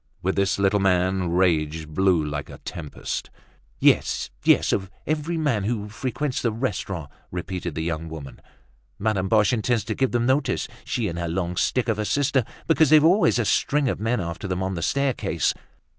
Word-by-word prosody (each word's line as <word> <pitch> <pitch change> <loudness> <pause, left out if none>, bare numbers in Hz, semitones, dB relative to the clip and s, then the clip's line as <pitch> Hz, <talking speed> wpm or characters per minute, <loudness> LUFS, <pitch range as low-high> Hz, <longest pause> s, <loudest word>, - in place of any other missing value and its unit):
With 95 +2 0
this 100 0 +1
little 100 +1 +2
man, 95 -1 +2
rage 80 -3 +1
blew 85 0 +2
like 75 -1 -4
a - - -9
tempest. 80 -4 -5 0.5
"Yes, - - +2
yes, - - +4
of 95 -1 -1 0.2
every 155 +2 -1
man 135 -11 0
who 105 -2 -2
frequents 130 +4 -3
the 115 - +1
restaurant!" 95 - -3 0.2
repeated 90 -2 -4
the 80 - -2
young 80 -1 -3
woman. 75 -4 -9 0.6
"Madame 100 -3 0
Boche 110 +2 +4
intends 120 -1 +1
to 110 +1 -3
give 130 +3 +1
them 120 -1 +1
notice, 135 +3 +1 0.2
she - - -1
and 85 0 -4
her 85 - -2
long 90 +1 -2
stick 125 +6 +1
of 110 -2 0
a 105 - -1
sister, 140 +1 +2 0.2
because 160 -3 +4
they've 155 -1 +7
always 185 -1 +4
a 120 - +1
string 145 +6 +2
of - - -1
men 115 +3 0
after 85 +3 -4
them 95 0 -2
on 95 0 -2
the 85 - -4
staircase." 140 - 0
100 Hz, 185 wpm, -24 LUFS, 85-125 Hz, 0.6 s, they've